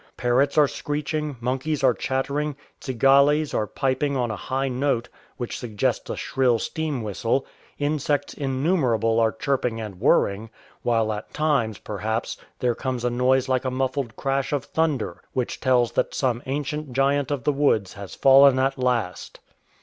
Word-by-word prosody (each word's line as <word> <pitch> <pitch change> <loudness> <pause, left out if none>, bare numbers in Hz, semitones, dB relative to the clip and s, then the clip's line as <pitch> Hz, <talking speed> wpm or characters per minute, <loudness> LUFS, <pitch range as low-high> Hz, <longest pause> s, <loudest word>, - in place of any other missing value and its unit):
Parrots 130 +4 +1
are 150 -1 +6
screeching, 150 0 -3
monkeys 130 +5 -2
are 130 -2 +5
chattering, 140 +4 -2 0.2
cigales 140 +4 +3
are 105 - 0
piping 135 +3 -1
on 120 -3 0
a - - -3
high 135 +7 -2
note 125 -2 -1 0.3
which 120 -2 -4
suggests 110 -5 -2
a - - -2
shrill 130 -3 +1
steam 150 -1 -3
whistle, 115 +5 -1 0.3
insects 145 -1 -1
innumerable 130 - +1
are 110 -1 +3
chirping 125 -2 -1
and 105 -5 -7
whirring; 110 -5 +2 0.3
while 115 -2 +1
at 105 +1 -7
times, 140 -9 +1
perhaps, 110 +2 -3 0.2
there 125 -1 +1
comes 125 0 -3
a 125 - +1
noise 130 +2 +2
like 130 -1 +1
a 130 - -1
muffled 130 -2 -2
crash 135 0 -1
of 145 -2 -1
thunder, 145 - -1
which 125 -2 -2
tells 125 -3 +2
that - - -1
some 125 -3 0
ancient 145 0 -3
giant 140 +1 +1
of 145 -4 -2
the 150 - +2
woods 125 -9 +1
has 100 -2 -9
fallen 135 0 +6
at 135 +1 0
last. 120 -8 -1
130 Hz, 155 wpm, -24 LUFS, 120-140 Hz, 0.3 s, are